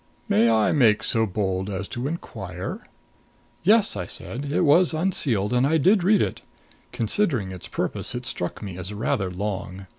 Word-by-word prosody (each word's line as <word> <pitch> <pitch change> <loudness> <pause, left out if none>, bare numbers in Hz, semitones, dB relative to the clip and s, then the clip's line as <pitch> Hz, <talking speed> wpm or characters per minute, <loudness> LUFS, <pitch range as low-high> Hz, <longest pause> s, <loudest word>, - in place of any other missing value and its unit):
May 115 +3 +4
I 110 -2 +3
make 115 -8 +3
so 110 -1 +1
bold 95 -1 -2
as 95 0 -4
to 120 +3 -3
inquire 95 - -6 0.4
" - - -36 0.3
"Yes," 210 +3 +4 0.2
said 135 +5 -4
I. - - -2
"It - - +3
was 165 +3 +4
unsealed 135 - +1
and 125 +2 +3
I 160 +2 +3
did 190 +5 +3
read 205 +2 +4
it. - - -4 0.5
Considering 115 - 0
its 90 -2 -8
purpose, - - -3
it 125 0 -5
struck 100 -4 -4
me 95 -3 -7
as 90 +2 -6
rather 100 -3 -1
long. 95 0 -5
110 Hz, 175 wpm, -24 LUFS, 95-155 Hz, 0.5 s, May